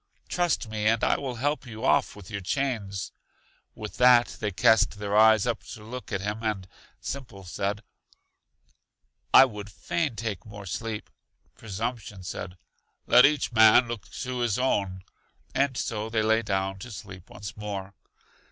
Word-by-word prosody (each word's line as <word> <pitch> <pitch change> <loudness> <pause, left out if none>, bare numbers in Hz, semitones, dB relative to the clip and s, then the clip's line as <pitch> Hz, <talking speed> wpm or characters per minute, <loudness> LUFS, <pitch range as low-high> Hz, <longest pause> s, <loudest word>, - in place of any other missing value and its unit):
Trust 175 -9 0
me, 110 -1 -1
and 115 +1 +2
I - - +4
will 130 -3 -4
help 140 +3 -1
you 110 +1 -6
off - - +3
with 105 0 -12
your 100 -1 -4
chains. 100 -4 -2 0.6
With 105 -1 -8
that 125 -1 +5
they 105 - -1
cast 105 +2 +3
their 105 0 -2
eyes 110 -1 +6
up 115 -3 -1
to 105 - -13
look 125 +3 -8
at 100 -2 -1
him, 105 +2 -3
and 105 -5 -2 0.3
Simple 120 -8 -7
said: 100 +4 -3 1.5
I 135 - +9
would 105 -4 -7
fain 140 - -2
take 110 -2 -4
more 105 -1 -10
sleep. 110 +3 -5 0.4
Presumption 110 -2 -5
said: 90 +1 -6 0.5
Let 125 +3 +8
each 145 -3 -1
man 110 +2 +7
look 115 -3 -6
to 125 0 -4
his 120 -4 +1
own. 100 -7 0 0.5
And 130 -1 +1
so 110 0 -2
they 110 -1 +1
lay 110 +1 +3
down 95 -2 -2
to 120 - -8
sleep 95 -4 -10
once 100 -1 -8
more. 100 -2 -5
110 Hz, 160 wpm, -27 LUFS, 100-120 Hz, 1.5 s, I